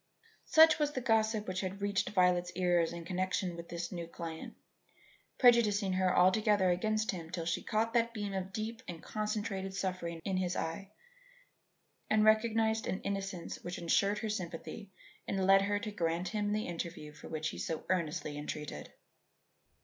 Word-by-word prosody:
Such 320 0 +7
was 295 -1 +1
the 260 - -1
gossip 220 -3 +1
which 185 0 -2
had 190 0 -4
reached 200 -1 0
Violet's 180 -3 +2
ears 175 -2 +2
in 170 -1 -7
connection 185 0 -1
with 170 0 -9
this 170 0 -4
new 170 -2 -5
client, 165 -1 -7 0.8
prejudicing 215 -6 +4
her 185 0 +2
altogether 190 0 +4
against 215 +4 0
him 170 -4 -7
till 170 -2 -4
she 165 - -1
caught 225 +1 0
that 235 -1 +2
beam 205 -3 -4
of 190 0 -3
deep 220 +3 -4
and 170 -2 -7
concentrated 210 -3 -3
suffering 180 -3 -3
in 190 -2 0
his 180 -1 -1
eye 180 +5 -3 1.2
and 215 0 +4
recognized 220 0 +3
an 190 - -3
innocence 195 -3 -4
which 175 +1 -5
ensured 195 +4 +2
her 220 0 -3
sympathy 190 0 -5 0.4
and 195 -1 0
led 195 0 +7
her 205 +1 +1
to 215 +1 -4
grant 170 -2 -1
him 205 +1 -1
the 215 +1 0
interview 165 -3 -5
for 150 - -11
which 155 0 -2
he - - -7
so 160 -1 -3
earnestly 160 -4 -1
entreated. 150 - -6
190 Hz, 165 wpm, -33 LUFS, 175-215 Hz, 1.2 s, Such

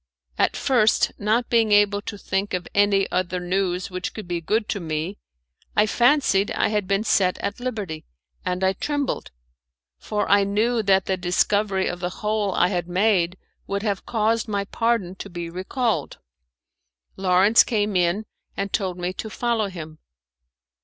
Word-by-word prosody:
At - - +2
first, 240 -6 +3
not 220 +4 +1
being 225 -2 +2
able 205 0 +4
to 205 +1 -6
think 195 0 -2
of 180 - -4
any 200 -1 +3
other 185 0 -1
news 180 0 -1
which 185 0 -4
could 215 -5 -7
be 175 -1 -2
good 215 +6 0
to 205 - -1
me, 160 +3 -4 0.6
I 210 - +5
fancied 240 -3 +3
I - - +1
had 210 -3 -1
been 195 +2 +1
set 190 -4 +2
at 205 - -4
liberty, 210 -11 -4 0.4
and 180 +1 -2
I 190 0 +3
trembled, 285 +7 -2 0.7
for 210 -1 -2
I 200 0 +5
knew 220 +4 +1
that 195 -2 +3
the 190 - 0
discovery 190 +2 +1
of 175 - -3
the 180 0 -2 0.2
hole 210 -2 +1
I 180 - +3
had 175 -3 -2
made 185 -2 +2 0.3
would 200 +1 -2
have 200 -3 -2
caused 225 0 +1
my 200 -2 -1
pardon 230 -4 0
to 200 - -7
be 170 -2 -6
recalled. 190 - -2 1.0
Lawrence 190 +4 +5
came 210 -3 -1
in 180 +4 +1 0.3
and 195 0 -3
told 185 -4 -1
me 180 +1 -3
to 220 - -6
follow 230 -1 0
him. 160 -4 -9
200 Hz, 165 wpm, -23 LUFS, 180-215 Hz, 1.0 s, I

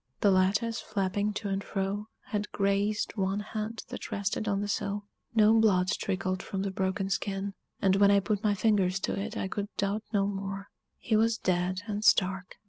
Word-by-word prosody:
The 200 - +5
lattice, 205 +5 +2
flapping 205 0 -1
to 205 0 -3
and 195 0 -1
fro, 200 +2 -2 0.2
had 210 0 -2
grazed 200 +2 0
one 195 +1 0
hand 215 +1 -4
that - - -7
rested 200 +2 -1
on 200 -1 +1
the 205 - -2
sill 205 0 -2 0.3
no 215 0 +6
blood 200 -5 +4
trickled 190 -1 -1
from 195 0 -3
the 200 - -2
broken 190 0 -1
skin, 195 0 -2 0.3
and 190 -1 +5
when 200 0 +6
I 200 0 +6
put 205 +1 -1
my 210 -1 +3
fingers 195 -2 +2
to - - -1
it 210 +3 -4
I - - -1
could 200 +1 -3
doubt 200 +2 0
no 200 -3 +2
more 195 0 -4 0.3
he 220 - 0
was 225 +1 +3
dead 185 0 0
and 210 -1 -3
stark! 190 -3 +3
200 Hz, 190 wpm, -29 LUFS, 195-210 Hz, 0.3 s, no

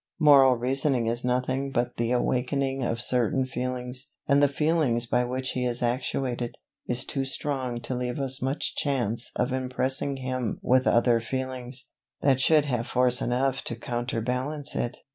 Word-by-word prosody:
Moral 140 -4 +7
reasoning 130 0 0
is 120 +2 -1
nothing 130 +2 0
but 120 -2 -1
the 115 0 0
awakening 135 +2 0
of 115 -1 -1
certain 125 +1 +1
feelings: 125 0 -3 0.2
and 140 0 +4
the 145 - +6
feeling 150 -3 +1
by 125 0 +3
which 130 +1 -2
he 125 - -2
is 120 0 -1
actuated, 120 0 -2 0.3
is 125 +1 0
too 135 - -2
strong 135 -2 -3
to 130 - -3
leave 125 +1 -3
us 135 0 -1
much 135 +3 -1
chance 120 -5 -1
of 125 - 0
impressing 130 +1 0
him 130 -3 -3
with 130 +1 +3
other 120 0 +4
feelings, 130 +1 -4 0.3
that 135 -2 +3
should 155 0 +5
have 120 -3 -2
force 125 0 +2
enough 130 +2 0
to 120 - -3
counterbalance 125 +5 -2
it. 120 - -2
130 Hz, 160 wpm, -27 LUFS, 120-135 Hz, 0.3 s, Moral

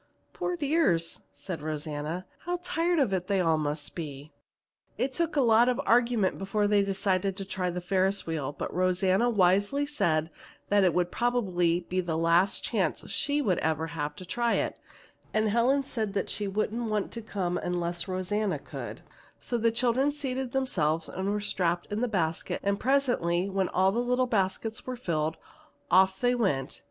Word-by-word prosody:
"Poor 360 - -2
dears!" 275 - +1
said 180 -5 -6
Rosanna. 155 +3 -4 0.2
"How 355 +1 -1
tired 345 0 +1
of 265 -10 +2
it 185 +1 -2
all 165 -3 +3
they - - -1
must 145 0 -3
be!" 150 -3 -7 0.7
It 265 +1 -1
took 335 0 -1
a 285 - +4
lot 235 0 +5
of 250 +1 0
argument 235 -4 +3
before 195 +2 0
they 205 0 +4
decided 195 -1 0
to 195 - -4
try 185 -1 -2
the 180 0 -4
Ferris 190 +2 +1
wheel, 155 -4 -2
but 145 - -5
Rosanna 185 +5 +2
wisely 205 +7 +3
said 165 - 0 0.4
that 205 -1 +4
it 180 - +3
would 180 -1 +1
probably 185 -8 +1
be 185 +1 -2
the 165 -3 -2
last 170 +4 +3
chance - - -1
she 290 0 0
would 185 -8 +1
ever 160 0 0
have 150 -2 -3
to 185 - -9
try 235 +5 0
it, - - -2 0.6
and 215 0 +2
Helen 245 +6 +3
said 220 -6 -3
that 200 - -1
she 205 -1 -2
wouldn't 215 +3 -1
want 210 -2 -1
to 230 - -5
come 185 -5 -2
unless 175 0 -2
Rosanna 190 +2 -1
could, - - -8 0.3
so 245 - -4
the 230 -1 +3
children 245 +4 +2
seated 265 -3 -3
themselves 165 - 0
and 190 +1 -3
were 210 +1 0
strapped 175 -4 0
in 215 - -1
the 250 - +2
basket, 170 -7 -1
and 200 0 0
presently 245 -10 +2
when 190 -1 0
all 190 +1 +3
the 230 - -1
little 250 +1 +1
basket 210 -1 0
seats - - -7
were 255 - -3
full, 160 -9 -1 0.6
off 190 +1 +5
they 245 0 +3
went. 170 - -1
195 Hz, 180 wpm, -28 LUFS, 175-240 Hz, 0.7 s, lot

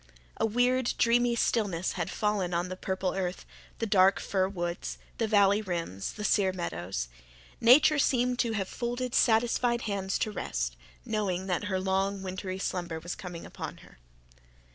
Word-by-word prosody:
A - - +2
weird, 245 +2 +2
dreamy 240 0 +3
stillness 200 -7 0
had 175 -1 -3
fallen 200 -5 0
on 175 +1 -1
the 185 - -4
purple 190 0 -2
earth, 185 -1 -3 0.3
the 230 - -1
dark 195 -2 +4
fir 190 -1 0
woods, 175 -2 -4 0.2
the 225 - +1
valley 205 -1 +4
rims, 170 - -4
the 210 - -7
sere 200 -2 +3
meadows. 90 - -4 0.5
Nature 280 +5 +6
seemed 250 -2 +2
to 230 -2 +1
have 195 -3 -1
folded 245 +2 -3
satisfied 235 +1 +3
hands 195 -2 -1
to 220 -4 -1
rest, - - -3 0.3
knowing 190 -4 -1
that 190 +2 -1
her 190 -2 -1
long 195 +1 0
wintry 185 0 -4
slumber 175 -4 -3
was 175 +2 -5
coming 175 -3 -8
upon - - -7
her. - - -19
195 Hz, 160 wpm, -29 LUFS, 180-225 Hz, 0.5 s, Nature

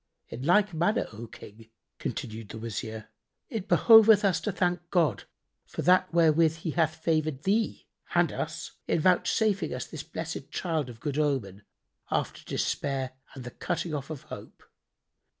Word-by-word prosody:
"In 125 - -7
like 185 +7 +3
manner, 175 +8 +1
O 115 +2 -8
King," 110 0 -13 0.3
continued 110 -1 -5
the - - -7
Wazir, 110 0 -5 0.4
"it 215 -5 -4
behoveth 220 -2 +7
us 190 -3 +2
to 210 - -1
thank 175 -2 -1
God 155 - +1 0.4
for - - -5
that 180 -3 +4
wherewith 165 -1 +4
He 165 0 -4
hath 160 -1 +1
favoured 155 -3 -1
thee 215 +3 0 0.3
and - - +4
us - - -5 0.2
in - - +2
vouchsafing 195 +4 +2
us - - -4
this - - -7
blessed - - -6
child 160 -7 -2
of 115 -2 -11
good 145 +2 -2
omen, 125 -10 -1 0.5
after - - -2
despair 135 -2 -2 0.2
and 130 - -8
the 125 - -7
cutting 175 +1 -3
off 140 -1 -4
of 155 -4 -6
hope. - - -10
160 Hz, 155 wpm, -28 LUFS, 130-180 Hz, 0.5 s, behoveth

